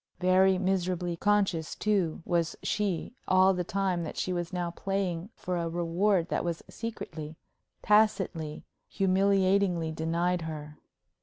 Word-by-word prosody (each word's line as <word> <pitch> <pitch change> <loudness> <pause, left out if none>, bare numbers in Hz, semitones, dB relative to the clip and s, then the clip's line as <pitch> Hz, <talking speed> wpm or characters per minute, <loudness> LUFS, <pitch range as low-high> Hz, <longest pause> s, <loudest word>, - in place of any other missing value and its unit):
Very 185 +1 +4
miserably 180 -2 0
conscious, 190 -4 +1
too, 190 -7 0
was 170 -2 0
she 205 -1 -1
all 185 +1 +5
the 180 -1 -1
time 185 -1 -1
that 160 - -6
she 185 - -1
was 175 -1 -3
now 175 -2 -2
playing 190 -1 -2
for 180 -1 -3
a 170 -1 -1
reward 175 +2 +1
that - - 0
was 170 -1 -3
secretly, 160 -9 -6 0.5
tacitly, 195 -7 +2 0.2
humiliatingly 190 -3 +2
denied 170 +3 0
her. 150 -2 -7
180 Hz, 130 wpm, -29 LUFS, 165-195 Hz, 0.5 s, all